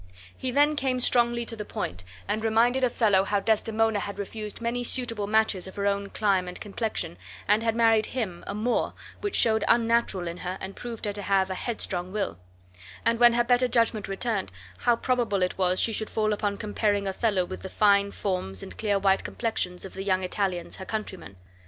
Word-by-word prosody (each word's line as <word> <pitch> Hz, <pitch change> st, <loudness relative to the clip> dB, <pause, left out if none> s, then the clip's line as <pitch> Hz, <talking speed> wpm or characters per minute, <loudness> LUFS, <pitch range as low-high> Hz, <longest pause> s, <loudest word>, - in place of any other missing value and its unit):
He 260 Hz, -, -3 dB
then 290 Hz, +4 st, +3 dB
came 260 Hz, -3 st, 0 dB
strongly 240 Hz, -1 st, +2 dB
to 230 Hz, -, -3 dB
the 215 Hz, -, -5 dB
point 90 Hz, -, -5 dB, 0.2 s
and 215 Hz, +2 st, -1 dB
reminded 235 Hz, +4 st, +3 dB
Othello 215 Hz, -6 st, +3 dB
how 205 Hz, +1 st, +1 dB
Desdemona 220 Hz, +1 st, +1 dB
had 200 Hz, 0 st, -5 dB
refused 210 Hz, +1 st, -5 dB
many 235 Hz, +1 st, -2 dB
suitable 230 Hz, -4 st, -1 dB
matches 215 Hz, -3 st, +1 dB
of 190 Hz, -, -10 dB
her 200 Hz, -, -2 dB
own 200 Hz, 0 st, 0 dB
clime 195 Hz, -4 st, +1 dB
and 180 Hz, -, -7 dB
complexion, 210 Hz, -, -3 dB, 0.3 s
and 210 Hz, +2 st, +4 dB
had 225 Hz, -1 st, 0 dB
married 225 Hz, -2 st, +4 dB
him, 200 Hz, -9 st, -4 dB
a 200 Hz, -, -3 dB
Moor, 230 Hz, +3 st, 0 dB, 0.2 s
which 410 Hz, -1 st, -3 dB
showed 220 Hz, -1 st, +4 dB
unnatural 230 Hz, -6 st, +2 dB
in 170 Hz, +1 st, -5 dB
her 180 Hz, +1 st, -4 dB
and 190 Hz, +1 st, -7 dB
proved 235 Hz, -3 st, -6 dB
her 205 Hz, -, -2 dB
to 205 Hz, -, -4 dB
have 190 Hz, -1 st, +1 dB
a -, -, 0 dB
headstrong 185 Hz, -3 st, -3 dB
will; 200 Hz, -, -3 dB, 0.7 s
and 230 Hz, 0 st, +2 dB
when 240 Hz, -1 st, +7 dB
her 240 Hz, 0 st, +3 dB
better 245 Hz, +1 st, +3 dB
judgment 230 Hz, -3 st, +1 dB
returned, 195 Hz, 0 st, -2 dB, 0.3 s
how 240 Hz, -1 st, +3 dB
probable 230 Hz, -6 st, 0 dB
it 180 Hz, -, -2 dB
was 185 Hz, 0 st, +2 dB
she 225 Hz, -, +2 dB
should 220 Hz, 0 st, -2 dB
fall 215 Hz, -1 st, +1 dB
upon 205 Hz, -1 st, -1 dB
comparing 205 Hz, -1 st, 0 dB
Othello 195 Hz, -1 st, +1 dB
with 185 Hz, -, -7 dB
the 190 Hz, -, -6 dB
fine 200 Hz, 0 st, +4 dB
forms 180 Hz, -, -3 dB
and -, -, -10 dB
clear 205 Hz, -2 st, +1 dB
white 195 Hz, 0 st, +2 dB
complexions 185 Hz, -6 st, -2 dB
of 190 Hz, -, -9 dB
the 190 Hz, -, -6 dB
young 190 Hz, -1 st, +1 dB
Italians 185 Hz, -2 st, -2 dB
her 190 Hz, -, -7 dB
countrymen. 190 Hz, -, -5 dB
210 Hz, 200 wpm, -27 LUFS, 190-230 Hz, 0.7 s, when